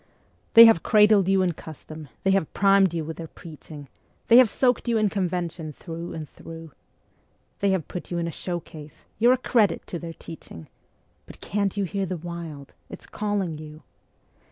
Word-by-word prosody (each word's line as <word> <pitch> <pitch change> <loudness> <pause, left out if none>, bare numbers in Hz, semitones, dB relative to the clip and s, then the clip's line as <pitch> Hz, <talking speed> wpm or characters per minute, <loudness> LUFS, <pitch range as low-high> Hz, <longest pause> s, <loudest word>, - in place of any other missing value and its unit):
They 230 0 +12
have 225 -8 +5
cradled 210 -2 +4
you 195 -1 +3
in 180 - +1
custom, 155 -1 -11
they 195 - +3
have 190 -5 +1
primed 195 -2 +4
you 165 -2 -3
with 160 +1 -7
their 165 - -7
preaching, 155 -3 -12 0.4
They 235 - +8
have 255 -3 +7
soaked 250 +1 +1
you 235 -1 +2
in 215 -1 +2
convention 175 -5 -3
through 170 +3 -8
and 155 -2 -6
through; 165 +1 -11 0.9
They 200 - +1
have 190 -6 -1
put 180 - -7
you 175 - -3
in 170 -1 -2
a - - -3
showcase; 160 -3 -8
you're 240 +3 +5
a - - +1
credit 225 -7 +1
to 170 - -6
their 165 -1 -7
teaching 85 - -11 0.6
But - - -11
can't 200 0 -2
you 200 - +1
hear 195 +1 -2
the 180 0 -3
Wild? 165 -4 -8 0.2
it's - - -10
calling 200 -7 -3
you. 155 0 -11
175 Hz, 180 wpm, -25 LUFS, 160-200 Hz, 0.9 s, They